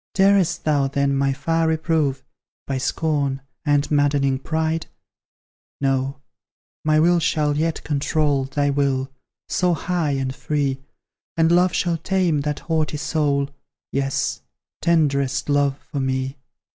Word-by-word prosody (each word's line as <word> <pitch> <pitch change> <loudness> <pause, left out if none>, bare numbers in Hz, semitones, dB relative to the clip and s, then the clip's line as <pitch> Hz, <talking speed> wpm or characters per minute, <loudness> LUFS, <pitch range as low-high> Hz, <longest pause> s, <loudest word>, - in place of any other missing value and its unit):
Darest 195 -3 +3
thou 145 -3 +2
then 140 0 0
my 135 0 +2
fire 165 +4 0
reprove, 160 -4 0 0.4
By 135 -1 -2
scorn, 140 -2 -1 0.2
and 145 0 +2
maddening 140 -2 +2
pride? 160 +2 -1 0.9
No 135 0 0 0.6
my 155 0 +3
will 175 +2 +4
shall 150 -2 +1
yet 160 +2 -1
control 145 -2 +1
Thy 145 +1 0
will, 135 -1 0 0.4
so 180 -2 +1
high 165 -2 -1
and 135 -1 -2
free, 140 -1 -1 0.6
And 165 0 +4
love 180 +1 +4
shall 170 -2 +1
tame 175 -4 +1
that 150 0 -3
haughty 155 -2 -1
soul 145 -2 0 0.4
Yes 135 0 -1 0.4
tenderest 140 -5 +1
love 145 -1 +2
for 145 - -2
me. 130 +1 -2
145 Hz, 125 wpm, -22 LUFS, 140-160 Hz, 0.9 s, will